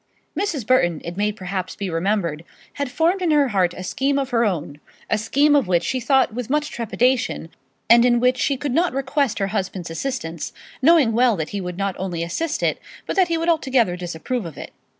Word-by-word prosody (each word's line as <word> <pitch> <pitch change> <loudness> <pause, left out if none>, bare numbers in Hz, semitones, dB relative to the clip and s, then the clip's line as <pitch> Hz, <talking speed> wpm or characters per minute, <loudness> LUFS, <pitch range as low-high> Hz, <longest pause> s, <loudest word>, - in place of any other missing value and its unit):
Mrs. 325 - -2
Burton, 175 -10 +2
it 170 +1 -5
may 210 +2 +1
perhaps 190 -2 -5
be 200 - -4
remembered, 170 -2 -1 0.3
had 285 -2 -3
formed 330 +8 +1
in 355 - +1
her 290 -3 +3
heart 185 -4 +1
a 185 - -6
scheme 275 +8 0
of 270 -1 -2
her 235 -1 +3
own 160 -8 -2 0.3
a 220 - +3
scheme 285 +7 +3
of 275 -8 +3
which 175 -2 +2
she 255 +8 -1
thought 265 -1 +2
with 245 0 -5
much 295 +1 0
trepidation, 240 -5 0 0.4
and 235 +1 +7
in 240 -1 +4
which 250 +1 +2
she 275 - +1
could 285 0 -3
not 340 +2 +2
request 275 -1 0
her 195 0 -1
husband's 185 -4 -3
assistance, 170 - -4 0.3
knowing 300 -4 +5
well 240 0 +4
that 160 -4 -3
he 200 - -4
would 180 -1 -5
not 195 -1 -1
only 180 -3 -3
not - - -1
assist 320 - -2
it, - - +1 0.3
but - - -3
that 380 -2 +4
he 335 -1 0
would 330 +1 -2
altogether 265 - +2
disapprove 180 +7 -4
of 160 - -11
it. - - -8
235 Hz, 215 wpm, -22 LUFS, 180-275 Hz, 0.4 s, and